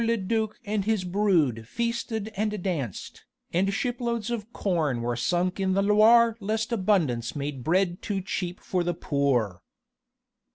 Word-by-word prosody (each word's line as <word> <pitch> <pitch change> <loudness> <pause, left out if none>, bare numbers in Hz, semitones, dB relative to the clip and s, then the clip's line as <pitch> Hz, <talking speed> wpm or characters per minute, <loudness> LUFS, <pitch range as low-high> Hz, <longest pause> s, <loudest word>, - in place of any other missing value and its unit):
le 230 0 +2
duc 220 +2 -1
and 205 -1 -1
his 215 -3 +1
brood 175 - +1
feasted 235 - -2
and 210 -2 -2
danced, 145 - -4 0.3
and 190 +3 +2
shiploads 235 0 -2
of 230 -1 -4
corn 160 - 0
were 120 0 -1
sunk 175 +10 0
in 190 -1 +1
the 195 +1 +2
Loire 220 +3 +6
lest 215 +2 -2
abundance 170 - +1
made 140 -3 -4
bread 175 +3 +1
too 200 -2 -2
cheap 180 -1 -4
for 180 -2 -1
the 175 -1 -1
poor! 135 - 0
195 Hz, 150 wpm, -26 LUFS, 160-215 Hz, 0.3 s, Loire